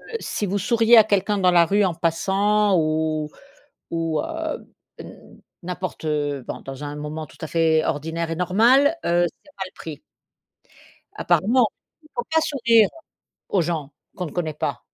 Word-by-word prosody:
heu, 460 - -6
si 210 - -3
vous 200 +1 -1
souriez 230 +3 +4
à 220 - +9
quelqu'un 205 0 +1
dans 185 -2 +3
la 170 -1 +5
rue 205 +3 +2
en 180 - +1
passant 195 +5 +1
ou 155 -1 0 0.6
ou 165 -2 -1
heu, - - -4 1.0
n'importe 180 -2 -5
heu, 145 -3 -1
bon - - -5
dans 135 +2 -8
un 145 - -5
moment 150 +1 -5
tout 130 - -18
à 160 - -4
fait 160 -1 +2
ordinaire 160 +2 -2
et 165 - -3
normal, 235 - +4
heu, 175 +1 +2
c'est 290 - -16
mal 190 -1 -4
pris. 150 -3 -8 1.2
Apparemment. 215 +8 +3 0.4
Il 305 - -21
faut 240 - -1
pas 320 - +3
sourire, 235 -8 +3 0.6
aux 190 -4 +2
gens, 155 -4 -3 0.2
qu'on 180 - -3
ne 155 - -8
connaît 160 -4 -2
pas. - - -3
175 Hz, 165 wpm, -23 LUFS, 155-210 Hz, 1.2 s, à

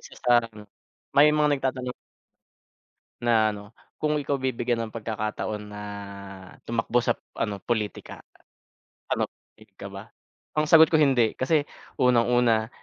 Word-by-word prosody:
isa - - -13
sarangem 115 -3 +1 0.5
may 150 +2 +7
mga 150 0 +3
nagtatanong 130 -2 -3 1.3
na 115 -2 +3
ano 105 0 -9 0.4
kung 150 0 +1
ikaw 145 -1 -1
bibigyan 120 -3 -1
ng 110 - -18
pagkakataon 110 -1 -3
na 105 0 -8 0.8
tumakbo 115 +1 0
sa 120 0 -1 0.5
politika 110 -3 -3 0.9
anop - - 0 0.3
ik - - -18
ka - - -7
ba? - - -10 0.5
Ang 155 - +3
sagot 160 -1 +8
ko 160 - +4
hindi 130 -7 +3
kasi 145 +3 +2 0.4
unang-una, 120 -2 +3
120 Hz, 120 wpm, -26 LUFS, 110-135 Hz, 1.3 s, sagot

